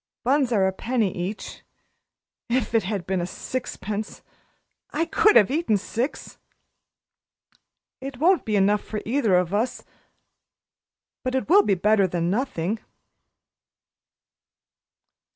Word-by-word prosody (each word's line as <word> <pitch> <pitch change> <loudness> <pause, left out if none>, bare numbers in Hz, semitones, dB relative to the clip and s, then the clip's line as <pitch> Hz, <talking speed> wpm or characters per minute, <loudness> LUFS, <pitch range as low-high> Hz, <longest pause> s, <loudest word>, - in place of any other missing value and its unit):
Buns 265 0 +2
are 200 -4 +3
a 190 - 0
penny 225 -2 -1
each. 185 +4 -5 0.9
If 245 0 0
it 225 - +4
had 195 -2 -3
been 185 -2 -1
sixpence! 215 0 -5 0.7
I 320 +3 -1
could 425 +5 +4
have 210 +2 +6
eaten 295 -8 +1
six. 230 +7 -4 1.6
It 270 -1 -7
won't 350 +6 +3
be 215 - -1
enough 205 +1 +3
for 215 -1 -5
either 230 -5 +2
of 180 0 +1
us 225 +5 -1 1.4
but 255 0 -2
it 265 - -1
will 390 +6 +7
be 200 - +1
better 200 +1 +3
than 175 0 -1
nothing." 215 -4 -1
220 Hz, 115 wpm, -24 LUFS, 195-260 Hz, 1.6 s, will